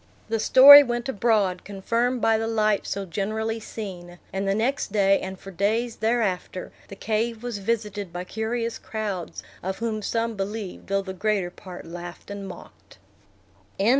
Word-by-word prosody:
The 225 0 0
story 280 +6 +10
went 240 -2 -2
abroad, 205 -6 +1
confirmed 230 +5 -1
by 225 -1 +3
the 225 - -2
light 215 -2 +1
so 200 0 -3
generally 220 +5 -2
seen; 180 -5 -8 0.2
and 195 +1 -2
the 195 - +2
next 245 +2 -1
day, 195 -2 +3
and 190 0 -6
for 195 - -11
days 220 +5 0
thereafter, 215 -5 -1 0.2
the 195 - -9
cave 225 +2 -2
was 240 -4 -4
visited 205 -3 -2
by 175 +1 -5
curious 225 +3 -3
crowds, 205 -6 -5 0.2
of 190 +1 -3
whom 220 -2 -2
some 230 +2 -1
believed, 200 0 -5
though 195 0 0
the 190 -1 -6
greater 195 -2 -1
part 180 -1 -10
laughed 175 +3 -9
and 200 -1 -6
mocked. 185 - -13
210 Hz, 160 wpm, -25 LUFS, 195-225 Hz, 0.2 s, story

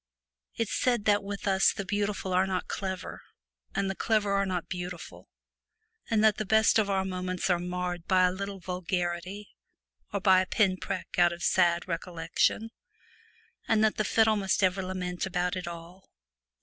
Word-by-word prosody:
It 230 - -1
said 240 0 0
that 205 -1 +3
with 200 0 -5
us 190 -1 +4
the 200 - -5
beautiful 205 -2 -2
are 185 +1 +3
not 185 -1 -2
clever 190 -3 -5 0.5
and 195 - 0
the 195 - -1
clever 210 0 +1
are 195 0 +1
not 180 -2 -2
beautiful, 180 -1 -7 0.8
and 220 -1 +2
that 215 -2 +4
the 215 - -1
best 220 +2 +4
of 205 -2 +1
our 190 -1 +1
moments 185 0 -2
are 175 - +2
marred 180 -1 -4
by 185 -2 +4
a 180 - +4
little 195 +1 -5
vulgarity, 180 +2 -3 0.6
or 200 - -1
by 190 -1 +5
a 185 - -3
pin 190 -3 +2
prick - - -4
out 175 -1 +5
of 170 0 -7
sad 175 -1 +2
recollection, 170 +5 -1 1.0
and 220 -2 +3
that 220 - +2
the 215 - +1
fiddle 220 +1 +3
must 195 0 0
ever 185 +1 +2
lament 185 -1 -3
about 180 0 -1
it 180 -1 -5
all. 170 +2 -10
190 Hz, 175 wpm, -28 LUFS, 180-205 Hz, 1.0 s, by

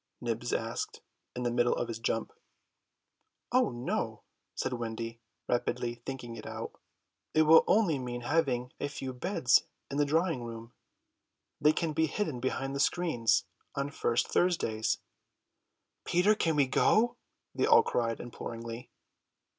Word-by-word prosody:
Nibs 120 0 -2
asked 115 +1 -3 0.3
in 125 - -3
the 120 - +1
middle 120 0 +2
of 120 - -2
his 115 -1 -5
jump. 115 -1 -1 1.2
"Oh 250 -1 +4
no," 120 +1 -3 0.3
said 130 - -2
Wendy, 115 -1 -4 0.3
rapidly 120 0 0
thinking 125 -3 -5
it - - -8
out, - - -5 0.6
"it 155 - +6
will 160 +1 +8
only 190 -10 +3
mean 120 -1 -4
having 125 -3 0
a - - -1
few 135 -2 -5
beds 130 0 +3 0.3
in 140 - -2
the 145 - +3
drawing 160 -1 +1
room; 115 0 -8 0.9
they 150 - +6
can 155 0 -1
be 160 +1 +2
hidden 155 - -2
behind 135 +2 -2
the - - -2
screens 145 -8 +2 0.3
on 140 +1 -2
first 120 - +1
Thursdays." 115 -12 +1 1.1
"Peter, 180 +5 +4
can 165 -7 +1
we 145 -2 +4
go?" 230 - +3 0.4
they - - +1
all - - +7
cried 115 -1 -1
imploringly. 115 0 -7
130 Hz, 140 wpm, -31 LUFS, 120-160 Hz, 1.2 s, will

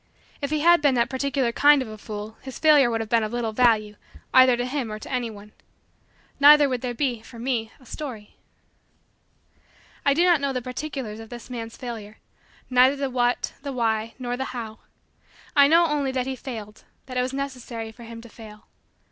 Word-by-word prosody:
If 280 - -2
he 305 0 0
had 345 0 +5
been 285 -3 +3
that 235 +1 +1
particular 270 -2 0
kind 290 +4 +5
of 260 - -3
a 215 - -8
fool 215 0 -7
his 265 -2 -8
failure 300 -5 +5
would 225 -1 -1
have 220 - -6
been 230 -1 +4
of 215 0 -3
little 240 -2 -2
value 215 -3 +2 0.4
either 255 -1 +6
to 245 - -1
him 255 -3 -3
or 215 - -4
to 215 - -10
any 250 -2 -1
one. 210 -1 -12 0.9
Neither 290 0 +8
would 255 -3 -2
there 245 -1 -3
be, 245 -4 -1
for 230 +1 -13
me, 230 -2 -2
a 260 - -19
story. 240 -6 -8 1.7
I 280 - +3
do 340 - +3
not 345 -5 +4
know 280 -1 -1
the 255 - -1
particulars 255 -4 -5
of 225 0 -10
this 240 +1 -10
man's 230 -2 -6
failure 220 -4 -7 0.5
neither 255 +2 +4
the 275 -1 -3
what, 245 -1 0
the 280 0 -5
why, 225 -3 -1
nor 245 -2 -3
the 265 +1 -3
how. 220 -2 -7 0.8
I 280 -1 +7
know 335 +3 +5
only 295 -4 0
that 255 -1 -1
he 265 0 -3
failed 220 -5 -8 0.2
that 255 - -9
it 250 - +2
was 255 +1 -2
necessary 250 -5 -5
for 235 - -16
him 230 0 -9
to 235 - -13
fail. 215 -1 -13
250 Hz, 205 wpm, -24 LUFS, 225-275 Hz, 1.7 s, Neither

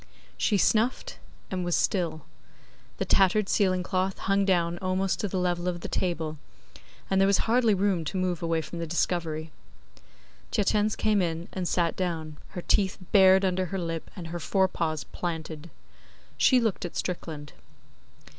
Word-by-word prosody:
She 205 - +1
sniffed 225 +6 +1 0.3
and 185 -1 -2
was 175 -1 +1
still. 170 -5 0 0.8
The - - -1
tattered 195 +2 +3
ceiling 185 -3 +2
cloth 185 +1 -1
hung 195 0 +1
down 175 -2 +1
almost 185 -2 0
to 205 - -1
the 190 - -3
level 175 -1 0
of 175 -1 -2
the - - -4
table, 160 -4 -2 0.7
and 190 0 +2
there 195 - +5
was 200 -1 +4
hardly 230 -2 +3
room 190 -3 +1
to 190 - -3
move 180 -2 -1
away 165 -1 0
from 170 +3 -7
the 165 - -3
discovery. 160 -2 -1 1.0
Tietjens 210 +1 +2
came 215 -2 +2
in 165 -1 -2
and 185 -2 -2
sat 170 -2 +1
down; 160 -4 -3 0.2
her 175 - -4
teeth 195 -2 +2
bared 190 -1 +6
under 185 0 0
her 195 - -4
lip 165 -2 -4
and 170 -3 -7
her 175 +1 -4
forepaws 165 -4 0
planted. 160 0 -5 0.7
She 255 - +5
looked 225 -5 -1
at 175 - -6
Strickland. 155 -5 -4
180 Hz, 160 wpm, -27 LUFS, 165-195 Hz, 1.0 s, bared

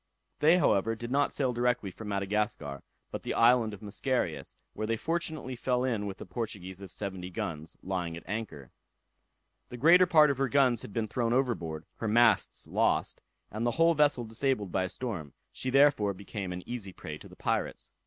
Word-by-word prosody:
They, 160 +4 +6
however, 115 - +2
did 120 +2 -7
not 140 +1 +2
sail 130 -3 0
directly 120 -4 0
for 110 - -10
Madagascar, 100 - -2 0.3
but - - -4
the - - -3
island 115 -1 +5
of 105 +1 -10
Mascarius, 125 +5 -2 0.2
where 110 - -3
they 115 0 0
fortunately 160 -3 -3
fell 125 +1 0
in 115 -5 -1
with 95 - -6
a - - -7
Portuguese 95 -2 -5
of 95 - -8
seventy 95 -2 -5
guns, 80 -3 -5
lying 90 -3 -3
at - - -10
anchor. 100 - -5 1.0
The 125 - -7
greater 175 +7 +6
part 155 -4 +6
of 135 - -4
her 135 -1 +1
guns 130 -4 +3
had - - -9
been 110 +1 -1
thrown 115 +2 0
overboard, 85 - -1
her 115 - -3
masts 115 +2 +3
lost, - - 0 0.3
and 110 +2 -3
the 120 - +2
whole 165 +1 +5
vessel 145 -5 +3
disabled 115 -3 -1
by 95 -1 +1
a - - -4
storm; 90 - -5 0.2
she 130 - -4
therefore, 130 -7 +4
became 100 -1 -6
an 90 0 -7
easy 110 -6 -5
prey 75 -3 -8
to - - -12
the - - -14
pirates. - - -2
115 Hz, 190 wpm, -30 LUFS, 95-130 Hz, 1.0 s, They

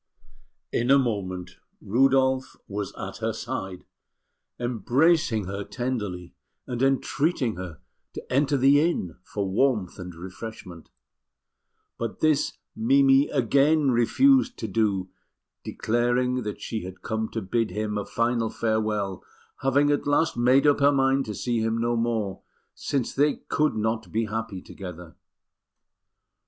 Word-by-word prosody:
In 120 +2 0
a 140 - +7
moment 95 -8 -2 0.2
Rudolf 130 +3 +2
was 100 -1 -4
at - - -6
her - - -2
side, 95 -1 -5 0.7
embracing 125 - +2
her 100 +2 -4
tenderly, 105 -8 -4 0.3
and 125 -1 -4
entreating 135 -1 +1
her 90 -4 -7 0.4
to - - -7
enter 140 +1 +2
the 140 +2 +5
inn 150 - -1
for 100 +1 -4
warmth 105 -2 0
and 90 -1 -7
refreshment; 95 -1 -9 1.1
but 115 -2 -4
this 155 -2 +2 0.2
Mimi 135 +4 +4
again 140 +3 +3
refused 260 - +3
to 110 - -4
do, 100 -3 0 0.5
declaring 120 +2 0
that 105 -2 -5
she 110 -2 -4
had 95 0 -9
come 110 0 -2
to 115 - -3
bid 110 +3 -1
him 105 0 -3
a 105 - -1
final 115 0 0
farewell, 110 -4 -1 0.4
having 140 +2 +3
at 145 - 0
last 145 +3 +2
made 125 +4 +4
up 145 -1 +4
her 140 0 +5
mind 135 0 +2
to 105 - -5
see 120 +3 -1
him 110 +1 0
no 120 +1 0
more, 115 -4 -1 0.3
since 135 -4 -2
they 145 +1 +2
could 155 0 +1
not 110 -3 -2
be 115 +1 0
happy 110 -3 -4
together. 90 -3 -9
115 Hz, 135 wpm, -25 LUFS, 105-135 Hz, 1.1 s, a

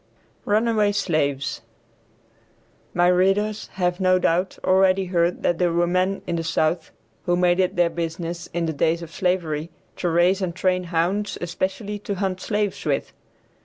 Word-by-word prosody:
RUNAWAY 215 -1 +2
SLAVES. 145 -8 -1 1.3
My 175 0 +4
readers, 195 +4 +2
have, 180 -1 -1
no 185 -1 +4
doubt, 180 +1 0
already 190 0 +3
heard 175 -1 0
that 175 - +1
there 175 -1 +2
were 170 +1 +2
men 185 +2 0
in 170 - -2
the 165 - -2
South 165 +1 0 0.4
who 175 - +3
made 175 0 +2
it 185 -1 +1
their 175 -1 +2
business 170 +1 -4
in 170 -1 -1
the 160 - -2
days 165 +3 0
of 165 - -10
slavery 170 -4 -1 0.3
to 175 - -1
raise 175 +4 +3
and 175 -3 -2
train 185 -1 0
hounds 180 +5 -1
especially 190 +4 -3
to 200 0 -4
hunt 185 -1 -2
slaves 210 -2 -1
with. - - -1
180 Hz, 160 wpm, -23 LUFS, 170-190 Hz, 1.3 s, My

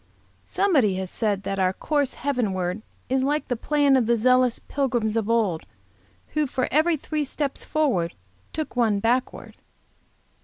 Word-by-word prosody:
Somebody 275 - +2
has 190 -1 -4
said 205 -3 -1
that 195 0 -3
'our 185 0 +2
course 285 +4 -1
heavenward 210 -8 -1 0.3
is 265 +1 +1
like 295 +3 0
the 245 - +1
plan 285 +3 +2
of 250 -4 +2
the 235 0 +3
zealous 255 +1 +3
pilgrims 240 -6 -1
of 225 -1 -1
old, 215 -8 +1 0.7
who 305 -1 0
for 255 0 -1
every 315 +3 +3
three 300 +1 -2
steps 280 0 -3
forward, 250 - 0 0.4
took 310 -4 -5
one 225 -4 +2
backward.' 240 +4 -1
250 Hz, 150 wpm, -24 LUFS, 210-285 Hz, 0.7 s, the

